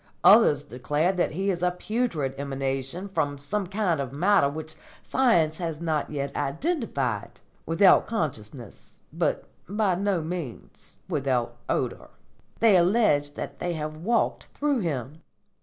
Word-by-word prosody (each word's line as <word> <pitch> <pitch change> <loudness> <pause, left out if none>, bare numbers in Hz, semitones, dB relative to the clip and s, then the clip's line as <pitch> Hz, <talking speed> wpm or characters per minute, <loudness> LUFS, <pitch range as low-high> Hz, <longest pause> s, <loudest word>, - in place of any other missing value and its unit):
Others 195 - +6
declare 145 +5 0
that 180 -4 0
he 195 +4 0
is 175 -2 -4
a 180 - +3
putrid 180 - -2
emanation 135 +5 -3
from 155 -7 -1
some 190 +8 -2
kind 190 -5 0
of 130 -2 -4
matter 155 0 +3
which 155 +2 -6 0.3
science 170 -12 +2
has 165 -4 -4
not 160 -3 -1
yet 140 -2 -4
identified, 140 - -2 0.3
without 165 +4 +5
consciousness, 125 - -5 0.2
but - - 0 0.3
by 205 -2 +1
no 190 -2 0
means 160 -7 -7
without 130 -4 -1
odour. - - -2 0.5
They 220 -4 +6
allege 170 -6 +3
that 140 0 -6
they 175 0 -2
have 155 -1 -4
walked 225 +9 0
through 285 -3 -1
him." 150 - -3
160 Hz, 135 wpm, -26 LUFS, 140-195 Hz, 0.5 s, Others